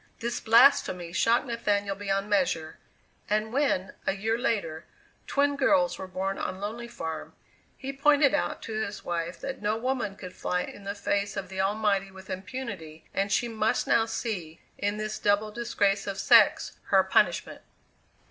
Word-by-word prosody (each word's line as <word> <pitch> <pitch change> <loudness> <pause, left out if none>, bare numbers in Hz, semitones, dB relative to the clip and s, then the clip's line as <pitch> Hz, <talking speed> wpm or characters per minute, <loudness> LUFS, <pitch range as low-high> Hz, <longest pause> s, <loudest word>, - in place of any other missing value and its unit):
This 235 0 -2
blasphemy 220 -8 +4
shocked 230 +7 +3
Nathaniel 205 -5 -1
beyond 195 0 -1
measure, 170 -6 0 0.5
and 215 +2 0
when, 255 -10 +1
a - - +3
year 220 +3 0
later, 205 -11 -2 0.4
twin 285 0 +2
girls 185 -10 +2
were 190 - -5
born 190 +1 -3
on 185 - -3
Lonely 225 +4 -5
Farm, 160 -9 -6 0.4
he 270 +1 -5
pointed 285 0 +4
out 295 - -1
to 225 - -6
his 215 -2 -3
wife 170 0 -3
that 270 - -5
no 210 +1 0
woman 245 -4 -2
could 185 -2 -9
fly 180 0 -1
in 200 - -10
the 200 +1 -3
face 200 0 -1
of 190 -2 -4
the 190 0 -2
Almighty 200 -1 +1
with 190 0 -11
impunity 185 -6 -6
and 200 +1 0
she 240 - +2
must 220 -1 0
now 225 -1 +3
see, 200 -8 -4 0.2
in 205 +1 -1
this 215 0 -4
double 205 +1 +2
disgrace 205 -3 0
of 195 -1 -3
sex, 195 - +4
her - - +4
punishment. - - +1
205 Hz, 165 wpm, -28 LUFS, 190-230 Hz, 0.5 s, blasphemy